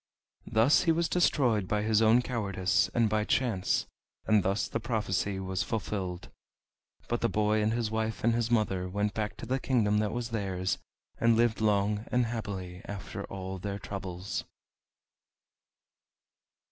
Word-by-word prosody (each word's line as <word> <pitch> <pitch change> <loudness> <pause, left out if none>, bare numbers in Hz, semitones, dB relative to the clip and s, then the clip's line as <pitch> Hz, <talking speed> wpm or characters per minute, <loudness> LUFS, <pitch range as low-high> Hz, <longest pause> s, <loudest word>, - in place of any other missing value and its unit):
Thus 115 +6 +4
he 165 - +5
was 165 +1 +1
destroyed 125 - +2
by 105 +1 0
his 110 0 +3
own 115 +3 +5
cowardice 100 -7 +1
and 115 -2 +4
by 105 0 +1
chance, 110 -5 +1 0.4
and 110 -1 +4
thus 95 +3 0
the - - -2
prophecy 105 -4 -1
was 95 -1 -2
fulfilled. 95 -3 -3 0.8
But 120 - -1
the 115 - +2
boy 105 0 +2
and 105 +1 +2
his 115 -1 -1
wife 110 0 -2
and 115 +1 +4
his 115 -1 0
mother 95 -6 +1
went 105 +2 -1
back 105 -1 -3
to - - -7
the 130 +1 0
kingdom 105 -6 +2
that 105 -1 0
was 120 -1 -3
theirs, 95 -4 -2 0.4
and 115 -1 +4
lived 115 -2 +2
long 105 0 +1
and 125 0 +3
happily 95 -6 -5
after 100 0 -6
all 95 0 -6
their 100 +1 -4
troubles. 95 -2 -5
105 Hz, 155 wpm, -30 LUFS, 95-115 Hz, 0.8 s, he